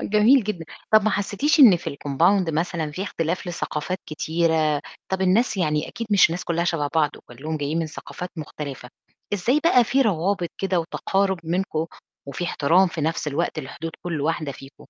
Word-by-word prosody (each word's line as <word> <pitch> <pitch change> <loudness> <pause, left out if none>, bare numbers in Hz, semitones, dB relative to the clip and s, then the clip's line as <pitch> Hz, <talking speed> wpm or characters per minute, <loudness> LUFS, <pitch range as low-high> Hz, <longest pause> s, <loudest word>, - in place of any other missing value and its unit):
أ - - -4
جميل 215 +4 +4
جدًا. 185 -5 -4 0.3
طَب 215 - +7
ما 215 - +3
حسّيتيش 210 +10 +1
إن 220 -9 +9
في 170 - -5
الcompound 165 +6 +1
مثلًا 160 0 -1
في 185 - -4
اختلاف 180 -1 -2
لثقافات 175 +1 -3
كتيرة، 155 -1 +1 0.3
طَب 190 0 -2
الناس، 210 +4 +2
يعني 150 -4 0
أكيد 230 - -6
مش 195 -5 +6
الناس 175 +2 -4
كُلّها 170 0 0
شَبَه 160 -4 0
بعض، 150 -2 +3
وكلّهم 150 +6 -6
جايين 150 +3 -2
من 165 - -1
ثقافات 175 +3 -8
مختلفة، 145 -5 -7 0.4
إزاي 245 +10 +1
بقى 255 -8 +5
في 270 +4 +2
روابط 190 -4 0
كده 190 -2 +1
وتقارب 190 +3 -1
منكم 165 -1 -1 0.4
وفي 140 +5 -4
احترام 175 +3 +3
في 170 -2 -5
نَفْس 160 +1 -1
الوقت 155 +2 -2
لحدود 160 +3 -6
كل 165 -4 -2
واحدة 155 -1 -1
فيكم؟ 135 +2 -13
170 Hz, 175 wpm, -23 LUFS, 155-195 Hz, 0.4 s, إن